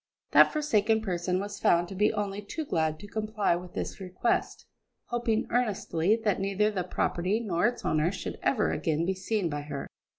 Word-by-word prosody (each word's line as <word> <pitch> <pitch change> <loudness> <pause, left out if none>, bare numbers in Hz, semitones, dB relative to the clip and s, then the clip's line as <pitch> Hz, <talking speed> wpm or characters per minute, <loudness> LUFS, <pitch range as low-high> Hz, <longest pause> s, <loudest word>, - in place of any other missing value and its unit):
That - - +7
forsaken 225 -8 +2
person 180 -2 -1
was 205 +1 -5
found 175 0 +3
to - - -6
be 210 +3 +3
only 205 -1 -3
too 305 +10 -5
glad 160 - 0
to 205 - -9
comply 215 -3 0
with 175 0 -8
this - - -4
request, 185 +5 -1 0.4
hoping 235 -2 0
earnestly 210 -5 +1
that 205 -3 +2
neither 200 +2 +1
the 190 -3 -2
property 180 +3 0
nor 195 -3 +1
its 245 - -4
owner 155 +3 +2
should 195 - -6
ever 220 -6 +2
again 160 -1 0
be 190 - +1
seen 190 0 -1
by 145 -2 -3
her. 145 -1 -6
195 Hz, 185 wpm, -28 LUFS, 175-215 Hz, 0.4 s, That